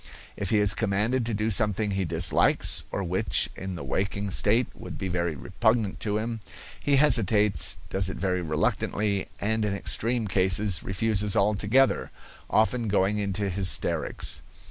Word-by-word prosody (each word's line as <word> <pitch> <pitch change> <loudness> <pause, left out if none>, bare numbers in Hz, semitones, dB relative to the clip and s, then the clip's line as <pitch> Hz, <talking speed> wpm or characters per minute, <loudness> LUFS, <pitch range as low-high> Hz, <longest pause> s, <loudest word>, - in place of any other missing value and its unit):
If - - -3
he 110 - +2
is 105 -1 +4
commanded 110 +4 0
to 115 - -1
do 110 +2 -1
something 105 0 +1
he 95 -1 -1
dislikes 80 +1 +2
or 100 - -3
which 90 +1 +1
in 95 0 -6
the 85 - -7
waking 100 +7 -2
state 110 +6 +3
would - - -9
be 95 - -4
very 85 -2 -2
repugnant 110 - -1
to 105 -1 -1
him, 115 +1 -3 0.4
he 145 - +1
hesitates, 105 - +3
does 95 -1 0
it - - -6
very 90 -2 -1
reluctantly, 95 +5 -1
and 110 +2 0
in 105 -2 -1
extreme 115 +3 -1
cases 95 -1 +1
refuses 105 +1 0
altogether, 105 +6 +2 0.4
often 115 +2 +2
going 100 +1 +1
into 100 0 -2
hysterics. 95 0 0
100 Hz, 150 wpm, -26 LUFS, 95-110 Hz, 0.4 s, is